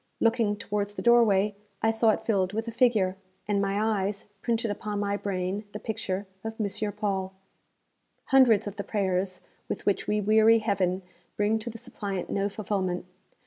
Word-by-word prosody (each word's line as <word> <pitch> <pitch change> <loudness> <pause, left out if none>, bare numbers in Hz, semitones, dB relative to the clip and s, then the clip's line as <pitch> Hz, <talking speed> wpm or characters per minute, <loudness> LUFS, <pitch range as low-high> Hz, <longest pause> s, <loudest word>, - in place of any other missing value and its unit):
Looking 225 -2 +2
towards 205 0 -3
the - - -5
doorway 215 -4 +5 0.3
I 225 - +4
saw 225 0 +3
it 215 - +1
filled 195 -3 +1
with 225 +2 -2
a - - -2
figure, 220 -6 +2 0.3
and 205 -1 +1
my 200 +1 0
eyes 210 -2 0 0.2
printed 230 -2 0
upon 205 0 -3
my 200 0 0
brain 195 0 -2
the 210 - -5
picture 200 -3 -3 0.2
of 225 0 -4
M. 205 0 -1
Paul. 195 -2 -2 1.0
Hundreds 255 -6 +6
of 205 0 -6
the 200 - -3
prayers 190 -3 -1 0.3
with - - -4
which 200 - +1
we 210 0 +1
weary 220 +2 +5
Heaven 195 -4 0 0.3
bring 210 +2 +2
to 220 - -5
the 230 - -8
suppliant 205 -6 -5
no 200 +1 0
fulfilment. 195 -4 -2
205 Hz, 170 wpm, -27 LUFS, 195-220 Hz, 1.0 s, Hundreds